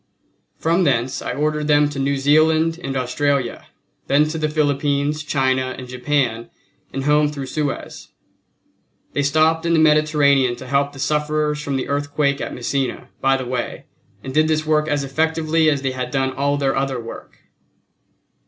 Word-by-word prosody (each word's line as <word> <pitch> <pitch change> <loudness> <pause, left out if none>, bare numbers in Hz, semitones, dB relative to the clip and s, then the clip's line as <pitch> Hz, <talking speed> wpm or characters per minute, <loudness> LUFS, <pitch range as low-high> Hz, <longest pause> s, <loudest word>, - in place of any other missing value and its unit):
From 170 +3 +1
thence 130 -3 0
I - - -3
ordered 150 +1 -1
them 145 -1 +4
to 145 -1 -6
New 140 +1 0
Zealand 155 +4 +3
and 135 0 -3
Australia, 130 0 -1 0.4
then 145 +2 +3
to 160 +1 -4
the 155 -1 0
Philippines, 145 0 0
China 130 -3 0
and 130 - -8
Japan, 125 -2 -1 0.4
and 135 - -4
home 150 +1 +3
through 140 -2 -5
Suez 145 +1 -4 1.1
they 145 - 0
stopped 155 +3 +2
in 170 0 +1
the 165 - +4
Mediterranean 150 -4 +3
to 130 - -10
help 140 +2 0
the - - -12
sufferers 150 +1 0
from 140 -2 -3
the 130 - -2
earthquake 145 0 0
at - - -4
Messina, 130 +2 -3
by 135 0 +2
the 130 - -5
way, 125 0 -4 0.4
and 130 - -6
did 155 +2 +3
this 155 0 0
work 155 0 +2
as 145 -2 0
effectively 160 +3 +1
as 140 -2 -1
they 135 - 0
had 125 -1 -4
done 130 0 -1
all 140 +2 0
their 135 -1 0
other 135 -2 -1
work. 115 0 -10
145 Hz, 170 wpm, -20 LUFS, 135-155 Hz, 1.1 s, them